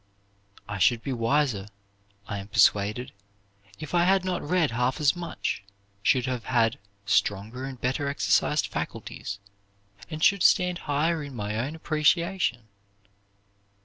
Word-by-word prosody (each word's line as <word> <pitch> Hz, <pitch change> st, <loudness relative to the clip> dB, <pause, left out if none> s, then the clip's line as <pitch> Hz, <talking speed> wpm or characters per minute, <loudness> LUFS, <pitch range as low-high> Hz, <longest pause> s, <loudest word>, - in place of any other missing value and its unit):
I 100 Hz, -, -5 dB
should 115 Hz, +4 st, +3 dB
be 135 Hz, -, -2 dB
wiser, 115 Hz, -3 st, +1 dB, 0.6 s
I 100 Hz, -, -4 dB
am 100 Hz, -, -8 dB
persuaded, 105 Hz, +2 st, +2 dB, 0.7 s
if 155 Hz, +1 st, -8 dB
I 175 Hz, -1 st, +4 dB
had 190 Hz, 0 st, +3 dB
not 180 Hz, -2 st, -1 dB
read 165 Hz, -2 st, +1 dB
half 125 Hz, +2 st, 0 dB
as 150 Hz, 0 st, +3 dB
much; 170 Hz, -, -4 dB, 0.4 s
should 125 Hz, +3 st, +3 dB
have 125 Hz, -3 st, -3 dB
had 115 Hz, -3 st, +2 dB, 0.3 s
stronger 105 Hz, +5 st, 0 dB
and 135 Hz, -2 st, -7 dB
better 130 Hz, +4 st, -1 dB
exercised 110 Hz, -10 st, +2 dB
faculties, 100 Hz, -1 st, -5 dB, 0.7 s
and 155 Hz, -1 st, -5 dB
should 200 Hz, -1 st, +4 dB
stand 180 Hz, 0 st, +4 dB
higher 155 Hz, +3 st, +1 dB
in 140 Hz, -2 st, -8 dB
my 105 Hz, -1 st, -3 dB
own 130 Hz, +8 st, -2 dB
appreciation." 160 Hz, -, +1 dB
130 Hz, 135 wpm, -26 LUFS, 110-160 Hz, 0.7 s, I